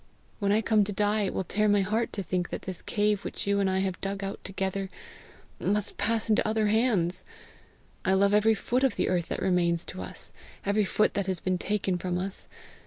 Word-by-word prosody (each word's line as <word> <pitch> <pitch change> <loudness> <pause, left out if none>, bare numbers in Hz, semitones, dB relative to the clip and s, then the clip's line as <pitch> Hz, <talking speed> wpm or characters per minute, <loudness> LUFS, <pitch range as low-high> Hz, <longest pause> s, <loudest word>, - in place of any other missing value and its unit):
When 200 -2 +1
I 215 +2 +4
come 215 -1 +4
to 205 - -4
die, 205 +1 +1
it - - -3
will - - 0
tear 210 +4 +1
my 205 -1 +4
heart 220 +4 0
to 200 - -3
think 180 -1 -1
that - - -5
this 185 -2 -5
cave 210 -1 0
which - - -4
you 200 0 +2
and 195 -1 +2
I 190 0 +1
have 190 -2 -2
dug 195 0 -3
out 195 0 -5
together, 195 0 -3 0.7
must 205 0 -1
pass 220 +2 +1
into 215 -1 +3
other 215 0 +1
hands! 205 -6 +2 0.8
I 190 - +2
love 200 +1 +4
every 215 +1 +5
foot 250 +5 0
of 270 - +3
the - - 0
earth 175 -2 0
that - - -3
remains 175 -2 +2
to 95 - -7
us 90 - -7 0.3
every 205 +1 +2
foot 215 +3 +2
that 200 -1 -1
has 185 -2 -1
been 185 -1 -1
taken 195 -3 0
from 180 0 -1
us. 190 +2 -3
200 Hz, 220 wpm, -28 LUFS, 185-210 Hz, 0.8 s, every